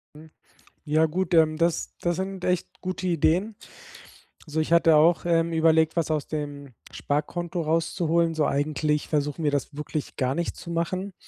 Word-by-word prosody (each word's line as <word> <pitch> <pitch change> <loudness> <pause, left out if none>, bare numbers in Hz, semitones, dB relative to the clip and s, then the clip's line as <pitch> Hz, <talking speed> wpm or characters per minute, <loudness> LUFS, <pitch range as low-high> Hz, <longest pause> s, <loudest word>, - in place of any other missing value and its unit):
Hm, 155 +1 -14 0.5
ja 155 +1 +3
gut, 185 +4 -2
ähm, 155 -1 +4
das 170 0 -1
das 175 -1 0
sind 190 -1 -4
echt 180 -1 -2
gute 185 0 -4
Ideen. 180 +5 +1 0.9
So, 155 +1 -2
ich 155 - -2
hatte 165 -1 +5
auch, 165 +3 +4
ähm, 165 -1 +2
überlegt, 160 0 +3
was 165 -1 0
aus 155 -2 -1
dem 145 -4 -6 0.2
Sparkonto 170 +4 -3
rauszuholen, 165 +1 +1
so 155 - +1
eigentlich 150 +1 0
versuchen 150 +1 -1
wir 145 - +3
das 145 0 -2
wirklich 150 0 -5
gar 130 +1 0
nicht 170 0 -2
zu 170 - -9
machen. 185 +3 -2
160 Hz, 165 wpm, -25 LUFS, 150-170 Hz, 0.9 s, hatte